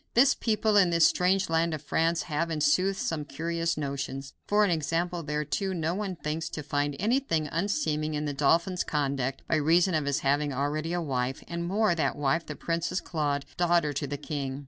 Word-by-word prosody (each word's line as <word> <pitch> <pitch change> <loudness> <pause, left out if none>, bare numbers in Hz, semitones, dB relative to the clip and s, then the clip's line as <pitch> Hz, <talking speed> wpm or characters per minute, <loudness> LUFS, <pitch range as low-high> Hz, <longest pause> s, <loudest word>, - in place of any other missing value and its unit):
This 265 +3 +6
people, 215 -2 +1
in 185 -3 +5
this 170 -1 +4
strange 185 +1 +2
land 165 0 +1
of 150 - -8
France, 165 +2 +1
have, 165 +1 -2
in 160 -2 -2
sooth, 190 +5 +2
some 160 -5 -2
curious 165 +4 -2
notions. 140 -1 -4
For 210 +1 +4
an 195 - +1
example 170 +2 -1
thereto: 150 +6 -2
no 165 -1 -1
one 195 -1 -3
thinks 160 +1 -3
to 150 - -6
find 145 0 -1
anything 210 - +1
unseeming 155 - -1
in 150 0 -2
the 145 - -2
dauphin's 165 +6 +2
conduct, 135 -3 -1
by 155 - +2
reason 170 +5 +3
of 155 -2 +1
his 140 +1 0
having 145 +1 +1
already 150 +4 -1
a 175 - 0
wife, 130 -2 -2
and 170 0 -4
more, 205 +2 +2
that 165 - 0
wife 145 +3 0
the 150 - -5
Princess 170 +3 -2
Claude, 145 -4 -2
daughter 170 -4 +2
to 145 +1 -3
the 145 +1 -4
king. 140 -2 -4
160 Hz, 195 wpm, -28 LUFS, 145-175 Hz, -, This